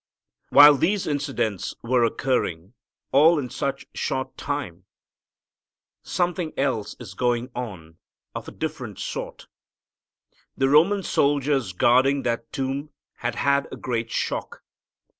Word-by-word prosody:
While 145 0 +9
these 190 +7 +1
incidents 140 - -2
were 120 +1 +2
occurring, 110 -7 -1 0.4
all 155 +5 +6
in 130 -4 -3
such 135 0 -3
short 130 0 -3
time, 105 - -5 1.2
something 175 -2 -2
else 115 -6 -1
is 110 -6 -9
going 120 +2 -1
on 90 -10 -7 0.3
of - - -6
a - - -7
different - - -5
sort. - - -6 1.1
The 135 0 +2
Roman 180 +8 +4
soldiers 140 - +1
guarding 130 +8 +3
that 115 -1 -2
tomb 135 +2 -3 0.3
had 120 -1 -3
had 140 +1 +1
a - - -7
great 115 -2 -3
shock. - - -3
135 Hz, 120 wpm, -24 LUFS, 115-145 Hz, 1.2 s, While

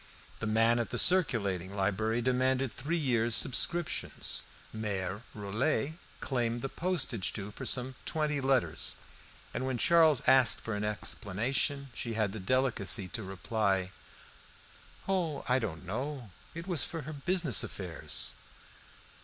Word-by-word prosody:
The 115 - -3
man 115 +2 +3
at 115 - -2
the - - -3
circulating 100 - +3
library 110 +4 0
demanded 130 0 +1
three 155 +7 -2
years' 120 -6 +2
subscriptions; 170 +5 +2 0.3
Mere 100 -3 -3
Rollet 115 +9 -1 0.3
claimed 120 -3 -1
the 135 - -2
postage 135 - -1
due 105 -1 -6
for 130 +4 -6
some 125 +2 0
twenty 150 -2 -1
letters, 135 -1 +1 0.6
and - - -3
when 130 -2 -1
Charles 160 -3 +4
asked 130 -4 +7
for 115 - -5
an 105 - -3
explanation, 120 +7 -1
she 115 -2 -4
had 110 -3 0
the 110 - -6
delicacy 105 -4 0
to 115 - -4
reply 95 0 -1 1.2
"Oh, 180 -6 -1
I 125 0 +3
don't 90 -8 -5
know. 125 +3 -5 0.2
It 170 +1 -6
was 175 -7 +1
for 165 -3 -5
her 155 +4 -7
business 155 - +2
affairs." 90 -4 -3
120 Hz, 135 wpm, -31 LUFS, 105-140 Hz, 1.2 s, asked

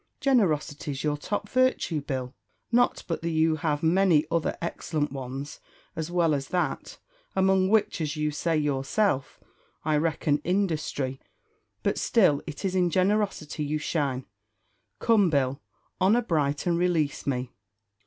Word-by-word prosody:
Generosity's 155 - +1
your 150 -1 +1
top 205 +7 -3
virtue, 255 - +1
Bill; 130 -2 -4 0.4
not 245 +1 +2
but 165 - -2
that 170 - -2
you 160 -1 +2
have 150 -2 -1
many 165 -2 +4
other 165 -2 0
excellent 155 -3 -2
ones, 135 +1 -6 0.4
as 160 0 -3
well 170 -3 +2
as 140 -1 -2
that, 175 -6 -2 0.4
among 190 0 +3
which, 215 -5 +2
as 150 0 -2
you 150 0 0
say 160 +2 0
yourself, 140 +1 0 0.5
I 155 -1 +2
reckon 150 -1 +1
industry; 155 -7 -1 0.6
but - - 0
still 185 - +3
it 155 +4 -6
is 190 - 0
in 180 -2 +2
generosity 185 -5 0
you 150 +1 -1
shine. 140 -4 -1 0.7
Come, 215 -6 +3
Bill, 140 -2 0 0.4
honour 215 +6 +4
bright, 145 -7 0
and 170 -1 +1
release 165 -6 0
me." 125 -2 -1
155 Hz, 140 wpm, -27 LUFS, 145-185 Hz, 0.7 s, many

